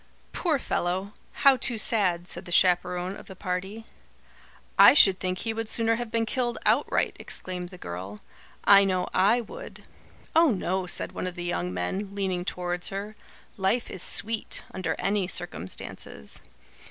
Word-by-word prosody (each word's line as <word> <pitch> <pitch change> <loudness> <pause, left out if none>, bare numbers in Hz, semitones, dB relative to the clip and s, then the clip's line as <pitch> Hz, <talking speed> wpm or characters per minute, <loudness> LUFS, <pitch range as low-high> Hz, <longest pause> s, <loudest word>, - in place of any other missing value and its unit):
"Poor 325 -5 +1
fellow! 190 -3 -2 0.3
How 275 -1 +8
too 240 -1 +1
sad!" 185 -6 +1
said 175 0 -4
the 175 - -9
chaperon 180 +1 +2
of - - -12
the 190 - -10
party. 190 +4 -4 0.9
"I - - +8
should 195 -9 +7
think 185 0 -2
he 225 +4 -2
would 225 0 -4
sooner 225 0 +1
have 240 -1 -4
been 225 0 0
killed 240 +1 -1
outright!" - - +2
exclaimed 180 -1 -5
the 180 - -11
girl. 95 - -7 0.4
"I 200 0 +8
know 185 -2 0
I 210 +6 +4
would." - - -10 0.5
"Oh, 325 0 +6
no," 185 -3 -1
said - - -3
one - - -4
of 180 - -5
the 175 - -5
young 90 - -2
men, 190 - -3
leaning 185 -3 -1
towards 180 -1 -3
her. 200 +2 -5 0.4
"Life 195 +5 0
is 190 - -5
sweet, 220 +3 0
under 185 - -2
any 195 -2 0
circumstances." 95 - -6
190 Hz, 160 wpm, -27 LUFS, 180-220 Hz, 0.9 s, How